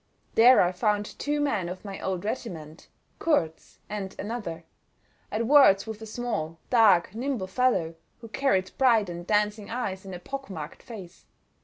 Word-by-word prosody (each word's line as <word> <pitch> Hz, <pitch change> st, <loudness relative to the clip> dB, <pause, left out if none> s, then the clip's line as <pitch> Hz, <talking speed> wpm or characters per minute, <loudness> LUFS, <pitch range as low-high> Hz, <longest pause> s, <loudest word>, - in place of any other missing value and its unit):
There 245 Hz, +1 st, +7 dB
I 175 Hz, -, +1 dB
found 205 Hz, +3 st, 0 dB
two 295 Hz, 0 st, -1 dB
men 205 Hz, -12 st, 0 dB
of 185 Hz, +3 st, -8 dB
my 195 Hz, -1 st, -7 dB
old 190 Hz, 0 st, -3 dB
regiment—Kurz 165 Hz, -, -3 dB
and 195 Hz, -2 st, -5 dB
another—at 210 Hz, +1 st, -7 dB
words 245 Hz, -7 st, +6 dB
with 220 Hz, -1 st, -7 dB
a 220 Hz, -, -7 dB
small, 215 Hz, -9 st, -3 dB
dark, 205 Hz, -7 st, +5 dB
nimble 245 Hz, -3 st, -2 dB
fellow, 190 Hz, -5 st, +1 dB, 0.3 s
who 230 Hz, -, -9 dB
carried 215 Hz, -7 st, 0 dB
bright 230 Hz, -7 st, +4 dB
and 175 Hz, +1 st, -8 dB
dancing 210 Hz, 0 st, 0 dB
eyes 200 Hz, -6 st, -3 dB
in 190 Hz, -2 st, -7 dB
a -, -, -7 dB
pock 270 Hz, +7 st, -7 dB
marked 155 Hz, -5 st, -7 dB
face. 190 Hz, -7 st, -11 dB
210 Hz, 150 wpm, -27 LUFS, 180-240 Hz, 0.3 s, There